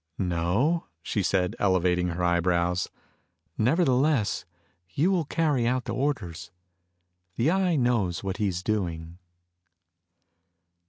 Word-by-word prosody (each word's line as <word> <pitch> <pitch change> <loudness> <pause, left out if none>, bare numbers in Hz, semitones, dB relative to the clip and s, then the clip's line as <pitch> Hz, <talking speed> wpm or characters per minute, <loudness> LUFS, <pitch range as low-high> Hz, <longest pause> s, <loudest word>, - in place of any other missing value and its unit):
"No?" 95 - 0 0.2
she 105 - -1
said, 90 -1 0
elevating 90 -2 +2
her 90 +1 -3
eyebrows. 85 0 +1 0.7
"Nevertheless, 130 - +2 0.4
you 155 - +1
will 175 -5 +1
carry 145 -6 +1
out 125 +1 0
the - - -3
orders. 95 - -2 0.9
The 130 +8 +2
Eye 185 -2 +2
knows 115 - +1
what 95 -1 -3
he's 95 -5 -1
doing." 85 -5 -3
100 Hz, 105 wpm, -26 LUFS, 90-135 Hz, 0.9 s, elevating